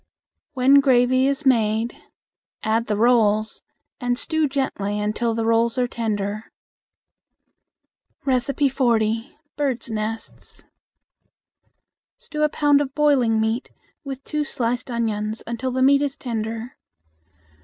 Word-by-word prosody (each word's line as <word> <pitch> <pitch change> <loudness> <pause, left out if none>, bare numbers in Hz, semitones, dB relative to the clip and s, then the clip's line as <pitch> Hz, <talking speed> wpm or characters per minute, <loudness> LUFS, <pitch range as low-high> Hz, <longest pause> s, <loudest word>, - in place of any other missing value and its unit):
When 270 +1 +5
gravy 255 -1 +3
is 280 +1 -1
made, 225 -2 +2 0.7
add 225 +1 0
the 210 - 0
rolls 220 -2 +2 0.4
and 245 -2 -1
stew 315 +1 0
gently 210 -7 -2
until 220 +2 -1
the 225 0 -1
rolls 230 +1 +2
are 250 -1 +2
tender. 215 -2 -3 1.7
40. 255 -3 +1 0.2
Bird 260 -5 -2
Nests. 220 +1 -5 1.5
Stew 300 - -6
a 300 - +4
pound 290 -1 +3
of 270 -2 -4
boiling 265 -7 +3
meat 220 +3 -1 0.3
with 275 -1 -7
two 300 -1 -2
sliced 245 -2 -2
onions 220 -2 -2
until 235 +3 -3
the 260 +1 0
meat 280 +1 +5
is 285 -2 -2
tender. 225 0 -4
240 Hz, 110 wpm, -22 LUFS, 225-270 Hz, 1.7 s, When